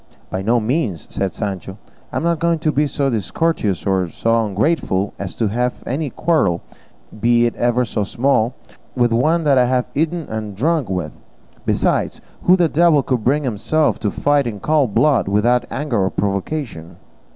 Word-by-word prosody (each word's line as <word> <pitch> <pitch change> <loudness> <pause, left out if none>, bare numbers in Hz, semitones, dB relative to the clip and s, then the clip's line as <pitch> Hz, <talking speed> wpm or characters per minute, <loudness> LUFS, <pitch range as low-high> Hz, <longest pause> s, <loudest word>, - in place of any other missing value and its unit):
"By 95 - -2
no 115 +5 +2
means," 115 - -2
said 95 -1 -1
Sancho; 95 -2 -5 0.3
"I - - -8
am - - -2
not 170 -1 +1
going 170 0 +2
to 155 -1 0
be 150 +1 +1
so 140 -1 0
discourteous 110 - -1
or 95 -3 +1
so 115 +4 +1
ungrateful 100 - 0
as 100 -2 -5
to 110 -3 0
have 125 +3 -2
any 145 +3 -2
quarrel, 125 - +1 0.6
be 120 +1 +3
it 120 - 0
ever 120 +1 +1
so 105 -1 -2
small, 120 +2 +1 0.4
with 120 -2 +2
one 155 +7 +2
I 130 -3 +5
have 125 0 +1
eaten 160 +2 -1
and 110 -2 -5
drunk 150 - 0
with; 90 -5 -2 0.6
besides, - - 0 0.3
who 180 - +7
the 175 -3 +3
devil 155 -2 +3
could 125 -4 -1
bring 145 +5 +2
himself 140 +6 0
to 105 - 0
fight 145 +3 +1
in 105 -3 -5
cold 145 -4 +1
blood, 145 -9 +3
without 120 +5 +2
anger 120 -5 -1
or - - +1
provocation?" 100 - -3
120 Hz, 175 wpm, -19 LUFS, 105-150 Hz, 0.6 s, who